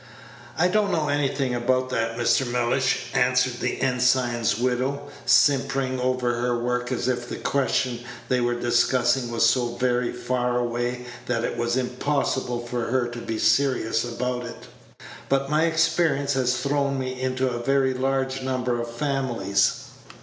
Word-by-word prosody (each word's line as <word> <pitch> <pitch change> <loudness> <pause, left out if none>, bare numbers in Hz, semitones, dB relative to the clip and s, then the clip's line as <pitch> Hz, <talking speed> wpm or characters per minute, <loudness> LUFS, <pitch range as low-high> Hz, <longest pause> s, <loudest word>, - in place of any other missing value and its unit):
"I 175 - +4
don't 205 +1 +1
know 155 -3 0
anything 140 -2 0
about 130 +1 0
that, 115 -1 -1
Mr. 120 +2 +2
Mellish," 125 +2 0
answered 125 0 +2
the 125 - -2
ensign's 125 -3 +2
widow, 130 +4 -1 0.2
simpering 135 -2 +3
over 125 -2 0
her 120 0 0
work 125 +1 -2
as 125 -1 -1
if 120 -1 -2
the - - -4
question 130 -3 0 0.3
they 125 -1 +1
were 120 0 0
discussing 120 +1 +2
was 115 -1 +2
so 120 0 +1
very 125 0 0
far 125 0 -1
away 120 +1 -2 0.2
that 115 -2 0
it - - -2
was 120 +1 0
impossible 125 -1 -1
for 120 -1 -3
her 125 0 0
to 120 0 -7
be 115 -1 -4
serious 115 0 +2
about 125 +1 -3
it; 120 - -9 0.6
"but 135 +1 +1
my 155 +2 +3
experience 160 -3 +1
has 125 -1 +1
thrown 140 +1 0
me 130 -1 -4
into 130 0 0
a 120 -1 -3
very 135 0 +2
large 135 0 -1
number 125 -2 -1
of 120 - -5
families." 120 -7 0
125 Hz, 155 wpm, -24 LUFS, 120-135 Hz, 0.6 s, I